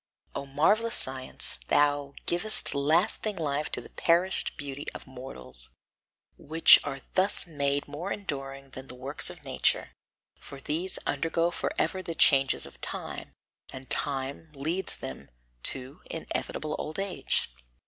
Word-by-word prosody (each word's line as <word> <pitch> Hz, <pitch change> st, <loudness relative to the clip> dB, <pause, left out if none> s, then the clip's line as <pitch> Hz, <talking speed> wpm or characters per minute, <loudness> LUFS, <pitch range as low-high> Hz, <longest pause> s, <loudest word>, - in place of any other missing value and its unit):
O 140 Hz, -, -5 dB
marvellous 210 Hz, -, +2 dB
science, 130 Hz, -, 0 dB
thou 145 Hz, -1 st, +2 dB
givest 195 Hz, +5 st, +2 dB
lasting 170 Hz, +9 st, +2 dB
life 150 Hz, -3 st, -2 dB
to -, -, -2 dB
the -, -, -14 dB
perished 175 Hz, +3 st, +3 dB
beauty 145 Hz, 0 st, -6 dB
of -, -, -8 dB
mortals, 65 Hz, -, 0 dB, 0.7 s
which 160 Hz, +2 st, +7 dB
are 135 Hz, -2 st, -5 dB
thus 190 Hz, +2 st, +3 dB
made 140 Hz, -3 st, 0 dB
more 155 Hz, +7 st, -5 dB
enduring 135 Hz, -7 st, -5 dB
than 130 Hz, +1 st, -8 dB
the 125 Hz, -, -9 dB
works 135 Hz, +3 st, -1 dB
of -, -, -11 dB
nature, -, -, 0 dB, 0.5 s
for 140 Hz, -, -10 dB
these 165 Hz, +7 st, 0 dB
undergo 165 Hz, +4 st, 0 dB
forever 185 Hz, +2 st, -1 dB
the 170 Hz, -3 st, -5 dB
changes 135 Hz, -4 st, +4 dB
of -, -, -14 dB
time, -, -, -5 dB, 0.4 s
and 130 Hz, 0 st, -10 dB
time 140 Hz, +3 st, -1 dB
leads 165 Hz, +7 st, +1 dB
them 65 Hz, -2 st, -8 dB, 0.3 s
to 130 Hz, -, +2 dB
inevitable 155 Hz, -1 st, -3 dB
old 155 Hz, +1 st, -4 dB
age! 195 Hz, -, -1 dB
145 Hz, 135 wpm, -28 LUFS, 135-170 Hz, 0.7 s, which